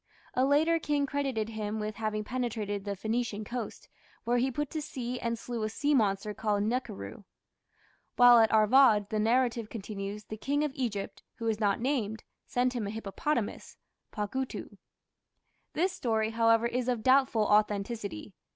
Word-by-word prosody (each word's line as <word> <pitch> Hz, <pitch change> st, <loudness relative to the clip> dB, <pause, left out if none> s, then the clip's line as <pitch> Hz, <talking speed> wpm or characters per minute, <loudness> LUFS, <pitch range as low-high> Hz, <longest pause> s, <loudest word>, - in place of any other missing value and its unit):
A 255 Hz, -, +2 dB
later 315 Hz, +4 st, +3 dB
king 290 Hz, -2 st, 0 dB
credited 270 Hz, -6 st, -2 dB
him 215 Hz, -1 st, -3 dB
with 215 Hz, -1 st, -4 dB
having 215 Hz, -1 st, -2 dB
penetrated 215 Hz, -4 st, -3 dB
to 205 Hz, -, -6 dB
the 200 Hz, -, -2 dB
Phoenician 220 Hz, +1 st, -2 dB
coast, 235 Hz, +1 st, -6 dB, 0.4 s
where 240 Hz, +1 st, +1 dB
he 260 Hz, +2 st, +2 dB
put 295 Hz, +2 st, -3 dB
to 310 Hz, -, -3 dB
sea 250 Hz, -3 st, -4 dB
and 235 Hz, 0 st, -2 dB
slew 235 Hz, 0 st, -5 dB
a 215 Hz, -, -1 dB
sea 285 Hz, +6 st, 0 dB
monster 210 Hz, -4 st, +1 dB
called 205 Hz, -1 st, 0 dB
the -, -, 0 dB
"nakhiru". 205 Hz, -, -4 dB, 0.9 s
While 245 Hz, -1 st, +8 dB
at 225 Hz, -1 st, +4 dB
Arvad, 215 Hz, -1 st, +5 dB
the 215 Hz, -, 0 dB
narrative 230 Hz, 0 st, +1 dB
continues, 205 Hz, -1 st, -6 dB
the 215 Hz, -, -8 dB
King 285 Hz, +6 st, 0 dB
of 300 Hz, -, -1 dB
Egypt, 230 Hz, -8 st, -3 dB
who 230 Hz, -, -6 dB
is 220 Hz, -2 st, 0 dB
not 205 Hz, -3 st, +1 dB
named, 230 Hz, -4 st, -1 dB, 0.2 s
sent 250 Hz, +1 st, +1 dB
him 230 Hz, -5 st, -2 dB
a -, -, -3 dB
hippopotamus 220 Hz, +3 st, -3 dB, 0.3 s
(pagutu). 250 Hz, +5 st, -4 dB, 0.9 s
This 360 Hz, +3 st, +1 dB
story, 220 Hz, -7 st, 0 dB
however, 230 Hz, 0 st, +3 dB
is 240 Hz, +1 st, -1 dB
of 240 Hz, -3 st, -1 dB
doubtful 260 Hz, -4 st, +4 dB
authenticity. 210 Hz, -, 0 dB
225 Hz, 165 wpm, -30 LUFS, 210-255 Hz, 0.9 s, While